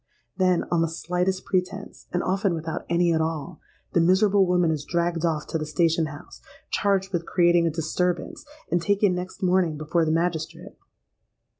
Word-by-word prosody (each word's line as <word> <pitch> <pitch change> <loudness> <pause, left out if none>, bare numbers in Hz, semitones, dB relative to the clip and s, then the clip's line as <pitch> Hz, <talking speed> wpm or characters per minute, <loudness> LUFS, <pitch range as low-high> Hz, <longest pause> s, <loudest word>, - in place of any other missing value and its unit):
Then, 185 -2 +2
on 170 -2 +2
the 165 - +2
slightest 180 +3 -2
pretence—and 180 -1 -3
often 195 -1 0
without 160 +1 -5
any 170 0 +2
at 160 - +1
all—the 160 +2 -4
miserable 190 +2 +4
woman 180 -2 +2
is 150 -2 -2
dragged 170 0 -1
off 160 -3 0
to 160 - -1
the 155 - -3
station 165 0 +1
house, 150 -1 -11 0.3
charged 195 -1 0
with 170 -1 -2
creating 175 -1 +3
a - - +2
disturbance, 170 +2 -2 0.3
and 175 - +2
taken 200 +1 +2
next 180 +2 -6
morning 180 -4 +2
before 160 +3 0
the 155 - +1
magistrate. 165 -1 -2
175 Hz, 160 wpm, -25 LUFS, 165-185 Hz, 0.3 s, miserable